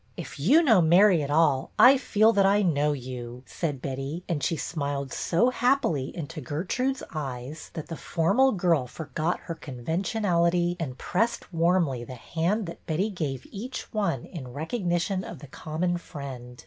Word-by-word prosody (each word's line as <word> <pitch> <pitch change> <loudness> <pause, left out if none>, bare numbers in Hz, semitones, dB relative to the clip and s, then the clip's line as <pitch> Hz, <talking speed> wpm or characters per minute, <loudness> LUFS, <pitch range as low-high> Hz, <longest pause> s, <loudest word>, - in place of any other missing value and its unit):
" - - -37
If - - -11
you 270 - +5
know 225 - +5
Mary 175 +2 +5
at 140 - -3
all, 145 -3 +3
I 260 +2 +8
feel 220 -4 +3
that 200 -1 +4
I 200 +2 +4
know 150 -4 +2
you," 125 -2 -6
said 145 -6 -4
Betty, 135 +5 -4
and 160 -4 -1
she 165 +3 0
smiled 140 -4 -3
so 235 +9 +2
happily 245 - +1
into 160 0 -5
Gertrude's 200 - -2
eyes 140 0 -5
that 160 - -4
the 165 - -6
formal 205 +14 +2
girl 170 - +1
forgot 155 +5 -3
her 170 - -5
conventionality 170 - 0
and 135 -6 -4
pressed 230 0 -1
warmly 165 -7 +2
the 130 +2 -8
hand 170 - -1
that 170 0 -9
Betty 185 +7 0
gave 145 -8 -4
each 245 +6 -7
one 200 - -1
in 155 -8 -8
recognition 175 +2 -1
of 170 - -8
the 140 - -11
common 160 +5 -2
friend. 130 -6 -8
165 Hz, 165 wpm, -27 LUFS, 140-190 Hz, -, I